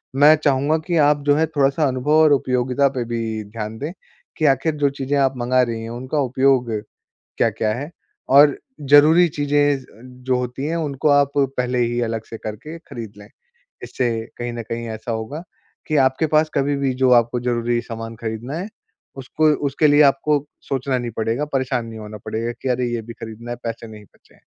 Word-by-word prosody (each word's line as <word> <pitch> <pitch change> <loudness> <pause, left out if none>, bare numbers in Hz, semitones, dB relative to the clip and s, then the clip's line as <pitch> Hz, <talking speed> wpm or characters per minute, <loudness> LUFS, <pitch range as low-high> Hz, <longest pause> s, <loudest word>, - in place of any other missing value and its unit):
मैं 145 +3 +7
चाहूँगा 145 +2 +2
कि 170 -2 +1
आप 145 -1 +2
जो 145 - +5
है, 160 +1 +2
थोड़ा-सा 145 0 +1
अनुभव 130 +3 -2
और 155 - +5
उपयोगिता 130 +1 +1
पे 120 - 0
भी 115 -2 -3
ध्यान 110 +1 -7
दें 150 +4 -4 0.5
कि 155 - 0
आख़िर 140 +3 +2
जो 140 - +5
चीज़ें 140 +1 -2
आप 135 -1 +2
मँगा 125 +1 +2
रहीं 115 -2 -3
हैं, 115 - -6
उनका 130 +5 -3
उपयोग 130 -2 +2 0.7
क्या-क्या 110 -1 +1
है? 140 +6 -5 0.4
और 140 +1 +6 0.2
ज़रूरी 150 +5 +6
चीज़ें 145 -1 +1
ज़ - - -15
अ, 110 - -20
जो 125 0 -3
होती 125 +2 -4
हैं, 160 +2 -1
उनको 150 -2 -1
आप 140 -1 +4
पहले 125 -2 0
ही 120 0 0
अलग 110 -1 -3
से 115 - -7
करके 110 +11 -7
खरीद 115 -9 -9
लें। 105 - -13 0.6
इससे 125 -2 -1 0.3
कहीं 120 0 -4
न 115 - -5
कहीं 115 0 -4
ऐसा 110 +1 -5
होगा 115 +9 -5 0.4
कि 155 - -1
आपके 130 +5 -1
पास 155 +1 +2
कभी 140 +1 +1
भी 135 -2 0
जो 130 - +5
आपको 120 +2 -4
ज़रूरी 120 -1 0
सामान 115 -1 -7
खरीदना 115 +6 -5
है, 195 +5 -5 0.5
उसको 150 +4 0 0.2
उसके 145 +3 +2
लिए 145 +1 +5
आपको 145 +2 +3 0.3
सोचना 135 -1 -2
नहीं 120 -1 -4
पड़ेगा, 115 +6 -1
परेशान 130 -4 -1
नहीं 110 -1 -9
होना 105 0 -8
पड़ेगा 115 +2 -3
कि, 135 - -4
"अरे! 125 0 0
ये 115 - -2
भी 115 - -9
खरीदना 115 +1 -9
है, 120 - -4
पैसे 115 0 -5
नहीं 105 -1 -12
बचे - - -27
हैं।" - - -27
130 Hz, 200 wpm, -21 LUFS, 115-145 Hz, 0.7 s, मैं